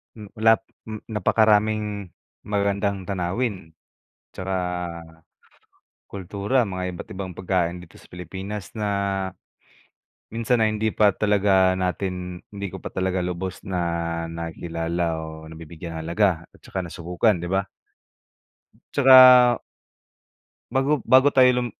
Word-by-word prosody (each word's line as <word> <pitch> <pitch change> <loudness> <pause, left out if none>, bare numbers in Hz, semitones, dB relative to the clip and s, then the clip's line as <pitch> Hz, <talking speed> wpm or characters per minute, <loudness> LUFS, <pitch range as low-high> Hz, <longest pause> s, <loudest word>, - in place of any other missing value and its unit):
hmm, 105 -1 -12
wala 110 0 +4 0.3
hmm, 110 -1 -6
napakaraming 105 -2 +1 0.3
magagandang 100 -2 -1
tanawin 95 -1 -3 0.6
tsaka, 95 0 -3 1.5
kultura, 100 +6 -1
mga 95 -2 -4
iba't - - -9
ibang 95 0 -5
pagkain 90 -2 0
dito 85 - -17
sa - - -19
Pilipinas 95 +3 -7
na 105 -2 -2 1.4
minsan 115 +1 0
na 110 - +4
hindi 110 0 -1
pa 105 -3 +3
talaga 100 -3 +3
natin 90 -1 -3
hindi 100 -1 -5
ko 95 - -8
pa - - -8
talaga 95 -1 -1
lubos 90 +1 -5
na 95 -2 -2 0.5
nakikilala 85 0 -3
o 80 0 -8
nabibigyan 80 +1 -9
ng - - -4
halaga 85 -1 +1
at - - -20
tsaka 95 -1 -5
nasubukan, 90 +4 0
di 85 - -5
ba? 95 +1 0 1.3
Tsaka 130 -3 +8 1.1
Bago 135 +4 +2
bago 130 +2 +6
tayo 130 -2 +6 0.2
lum - - -2
95 Hz, 120 wpm, -23 LUFS, 90-110 Hz, 1.5 s, Tsaka